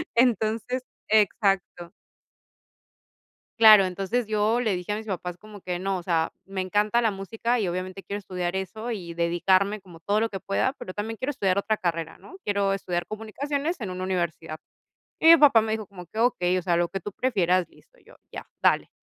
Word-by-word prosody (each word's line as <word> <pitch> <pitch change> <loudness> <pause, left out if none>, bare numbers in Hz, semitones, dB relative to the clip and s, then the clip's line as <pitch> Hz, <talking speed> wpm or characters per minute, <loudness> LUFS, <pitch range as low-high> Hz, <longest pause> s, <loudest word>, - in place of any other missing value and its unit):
Entonces 235 +1 +1 0.3
exacto. 195 -5 +1 1.7
Claro, 215 -3 +9
entonces 195 +5 -2
yo 215 +2 +1
le 220 -6 0
dije 180 +3 -5
a 210 - -1
mis 220 - -7
papás 180 -3 -4
como 210 +1 -13
que: 180 -1 -4
"No, 195 +1 -1
o 175 - -7
sea, 165 -2 0
me 195 0 -6
encanta 210 +5 +1
la 225 - +3
música, 225 +5 -2
y 200 - 0
obviamente 185 +2 -5
quiero 200 - -4
estudiar 180 -2 -4
eso 220 +5 -5
y 175 -6 -5
dedicarme 185 +4 +2
como 175 -4 -15
todo 205 +5 +1
lo 225 - +1
que 195 -3 -6
pueda, 230 +7 0
pero 185 - -8
también 215 +3 -4
quiero 260 - -3
estudiar 195 -7 0
otra 210 +2 0
carrera, 165 -2 -3
¿no?, 375 - -14
quiero 200 -1 +1
estudiar 175 -3 -3
comunicaciones 280 - -3
en 205 -6 -4
una 185 0 -5
universidad". 170 -4 -3 0.6
Y 320 - +3
mi 335 - +10
papá 275 -7 +6
me 220 0 -2
dijo 215 -2 -4
como 180 -2 -11
que: 215 +6 -7
"Okey, 185 -7 +2
o - - -1
sea, 175 -1 +1
lo 175 - +2
que 195 +2 -5
tú 205 - -6
prefieras, 185 -7 +1
listo". - - -24
Y - - -29
yo: - - -18 0.2
"Ya, - - -8
dale". - - +3
195 Hz, 200 wpm, -25 LUFS, 180-220 Hz, 1.7 s, mi